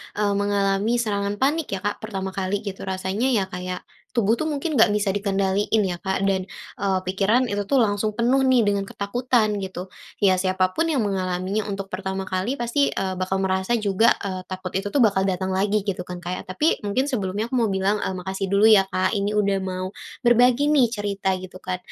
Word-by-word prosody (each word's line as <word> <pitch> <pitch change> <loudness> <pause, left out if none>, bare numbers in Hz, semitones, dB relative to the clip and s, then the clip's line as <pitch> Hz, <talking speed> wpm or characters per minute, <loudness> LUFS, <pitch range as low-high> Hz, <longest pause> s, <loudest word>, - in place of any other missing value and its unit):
eee, 205 -1 +1
mengalami 200 +2 +1
serangan 200 -2 -1
panik 300 +3 +1
ya - - -4
Kak, 205 - -2
pertama 195 -3 -4
kali 195 +2 -2
gitu 195 -2 -6
rasanya 190 +6 -1
ya 215 -6 +2
kayak, 180 0 -5 0.3
tubuh 225 -1 +3
tuh 315 - -1
mungkin 300 +2 -2
nggak 225 - +8
bisa 205 -2 +1
dikendaliin 200 +1 +1
ya 175 -2 -2
Kak, 190 0 -1
dan, 190 -1 0 0.3
eee, 190 -2 +1
pikiran 205 +7 +2
itu 205 0 0
tuh 275 - +3
langsung 210 0 -1
penuh 250 +3 +3
nih 250 -3 +4
dengan 200 -1 0
ketakutan 215 0 0
gitu, 185 -1 -6 0.3
ya 190 -1 +6
siapa 185 0 +1
pun 330 +1 +1
yang 270 -8 +1
mengalaminya 190 +1 -1
untuk 195 -1 -5
pertama 190 0 -3
kali 190 +8 -2
pasti, 240 +4 +1
eee, 190 -1 -1
bakal 185 +1 -1
merasa 190 +4 +1
juga, 210 +2 +3
eee, 185 -2 -3
takut 185 -1 -5
itu 195 +2 -1
tuh 280 - +2
bakal 195 -2 +3
datang 190 0 -1
lagi 200 +1 +1
gitu 185 -3 -2
kan 180 -1 -6
Kak 175 - -4
ya? - - -4
Tapi 295 - +1
mungkin 210 +6 0
sebelumnya 205 -1 -1
aku - - -1
mau 225 - +2
bilang, 195 +2 +1
eee, 190 - -2
makasih 190 +1 -3
dulu 200 +2 +4
ya 195 -2 +6
Kak 185 -1 0
ini 205 +1 0
udah 200 -2 +2
mau, 185 0 -4 0.3
berbagi 245 +5 +4
nih 265 -5 +5
cerita 200 -3 -1
gitu 185 0 -10
kan, 185 0 -3
200 Hz, 205 wpm, -23 LUFS, 190-220 Hz, 0.3 s, nggak